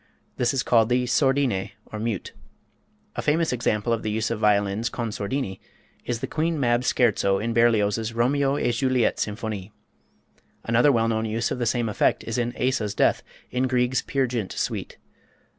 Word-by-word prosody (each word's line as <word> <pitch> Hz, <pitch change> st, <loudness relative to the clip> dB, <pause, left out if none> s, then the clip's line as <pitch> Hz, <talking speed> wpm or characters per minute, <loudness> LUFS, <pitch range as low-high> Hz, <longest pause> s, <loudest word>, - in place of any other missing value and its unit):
This 120 Hz, -, +2 dB
is 135 Hz, -, 0 dB
called 115 Hz, -2 st, +3 dB
the 125 Hz, 0 st, +2 dB
sordine, 130 Hz, -5 st, +1 dB
or 110 Hz, -, -7 dB
mute. 110 Hz, -3 st, -3 dB, 0.8 s
A -, -, -2 dB
famous 160 Hz, 0 st, +1 dB
example 115 Hz, -2 st, 0 dB
of 115 Hz, -, -1 dB
the 110 Hz, -, -3 dB
use 110 Hz, +1 st, -1 dB
of 115 Hz, -, -2 dB
the -, -, -11 dB
violins 105 Hz, +1 st, +2 dB
con 115 Hz, -3 st, -4 dB
sordini 100 Hz, -1 st, -3 dB, 0.5 s
is 120 Hz, -2 st, -3 dB
the -, -, -1 dB
Queen 160 Hz, 0 st, -1 dB
Mab 120 Hz, -2 st, +2 dB
Scherzo 110 Hz, -6 st, +2 dB
in 115 Hz, +3 st, -2 dB
Berlioz's 110 Hz, -1 st, +2 dB
"Romeo 135 Hz, +4 st, +1 dB
et 120 Hz, -4 st, +1 dB
Juliette 125 Hz, 0 st, +1 dB
Symphonie." 105 Hz, -2 st, -4 dB, 0.9 s
Another 120 Hz, +5 st, +4 dB
well 115 Hz, -3 st, +2 dB
known 110 Hz, -1 st, 0 dB
use 115 Hz, +1 st, -1 dB
of -, -, -2 dB
the 120 Hz, -, 0 dB
same 120 Hz, 0 st, 0 dB
effect 105 Hz, -, +1 dB
is 115 Hz, +1 st, -2 dB
in 120 Hz, 0 st, -2 dB
Asa's 120 Hz, -6 st, 0 dB
Death, -, -, +2 dB, 0.3 s
in 125 Hz, +1 st, 0 dB
Grieg's 125 Hz, 0 st, +1 dB
"Peer 135 Hz, -1 st, 0 dB
Gynt" 115 Hz, -6 st, -3 dB
Suite. -, -, -3 dB
115 Hz, 175 wpm, -24 LUFS, 110-125 Hz, 0.9 s, Another